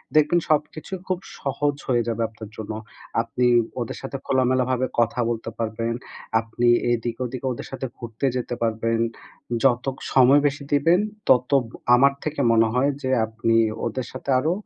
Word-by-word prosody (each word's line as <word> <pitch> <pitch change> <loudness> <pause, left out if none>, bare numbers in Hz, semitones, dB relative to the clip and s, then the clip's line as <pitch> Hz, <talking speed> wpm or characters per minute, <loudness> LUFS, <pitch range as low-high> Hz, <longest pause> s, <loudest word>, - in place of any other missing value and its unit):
দেখবেন 155 +3 +5
সবকিছু 155 +3 -1
খুব 185 -1 -1 0.2
সহজ 145 +1 -1
হয়ে 120 -2 +2
যাবে 115 0 -1
আপনার 110 -1 -10
জন্য। 110 0 -5 0.5
আপনি 125 +2 0 0.3
ওদের 120 - -4
সাথে 135 0 -5
খোলামেলাভাবে 130 -1 +2
কথা 120 +1 +2
বলতে 115 -1 -3
পারবেন। 115 +1 -2 0.5
আপনি 115 +1 -1 0.2
এইদিকে 120 +1 -2
ওদিকে 130 +2 -6
ওদের 120 - -6
সাথে 130 0 -4
ঘুরতে 115 +2 -4
যেতে 120 0 -3
পারবেন। 115 0 0 0.6
যত 130 0 +2 0.2
সময় 135 +2 +6
বেশি 140 0 -3
দিবেন, 165 +6 +4 0.3
তত 125 +1 +4 0.4
আমার 140 +2 +5
থেকে 155 -2 -2
মনে 115 0 +4
হয় 135 +3 +2
যে 130 - 0 0.2
আপনি 110 +1 0 0.3
ওদের 120 +2 -3
সাথে 130 - -8
আরো 155 +5 +1
125 Hz, 150 wpm, -23 LUFS, 115-140 Hz, 0.6 s, সময়